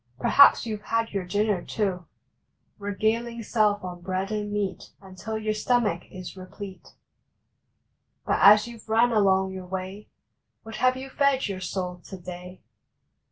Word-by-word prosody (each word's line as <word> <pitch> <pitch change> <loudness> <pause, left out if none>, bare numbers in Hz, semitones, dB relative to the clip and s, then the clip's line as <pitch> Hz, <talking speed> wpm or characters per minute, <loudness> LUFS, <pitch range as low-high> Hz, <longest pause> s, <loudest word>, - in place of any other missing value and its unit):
Perhaps 280 - +6
you 220 -2 -3
ve 210 - -21
had 230 0 0
your 195 -2 -3
dinner, 205 -1 0
too, 185 -5 -2 0.7
Regaling 225 +3 -1
self 210 -2 +1
on 180 -1 -7
bread 190 +2 -3
and 210 -1 -3
meat 205 -2 -3
Until 200 +3 -6
your 215 0 -1
stomach 215 -5 0
is 185 0 -9
replete. 190 +1 -10 1.3
But - - +1
as 210 +2 +8
you 235 -1 -10
ve - - -17
run 230 +2 +3
along 190 -3 +3
your 185 -1 -8
way 190 +2 -6 0.5
What 225 -1 -8
have 255 +2 +2
you 265 +1 -8
fed 280 -3 +2
your 190 -2 -5
soul 180 -2 -4
to 190 - -8
day? 180 +1 -10
205 Hz, 155 wpm, -26 LUFS, 185-220 Hz, 1.3 s, as